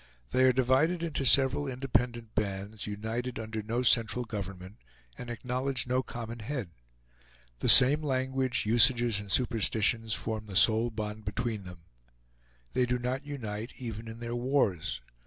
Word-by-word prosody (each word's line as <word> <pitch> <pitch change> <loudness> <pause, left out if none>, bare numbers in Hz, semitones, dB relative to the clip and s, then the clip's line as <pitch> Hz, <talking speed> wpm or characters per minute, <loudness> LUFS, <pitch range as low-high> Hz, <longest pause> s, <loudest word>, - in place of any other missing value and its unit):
They 130 0 +3
are 130 - +5
divided 130 +7 +1
into 155 -4 -3
several 135 +2 +3
independent 125 -3 -2
bands, 100 +1 -4
united 110 +4 -5
under 110 0 -5
no 115 +4 -3
central 120 0 +2
government, 100 -2 -8 0.4
and 120 - -9
acknowledge 125 +2 -2
no 125 +1 0
common 120 -1 -8
head. 115 - -5 0.9
The - - +1
same 145 +5 +10
language, 130 -3 -1
usages, 120 0 +3
and 100 -1 -7
superstitions 115 -1 +2
form 110 -1 -5
the 95 - -9
sole 110 +4 +4
bond 110 -1 -6
between 105 0 -4
them. 90 -2 -12 0.9
They 125 -1 +1
do 125 0 0
not 130 +4 -4
unite 115 -5 -6
even 115 -2 -7
in 115 0 -8
their 120 0 -5
wars. 120 - -1
120 Hz, 145 wpm, -29 LUFS, 110-130 Hz, 0.9 s, same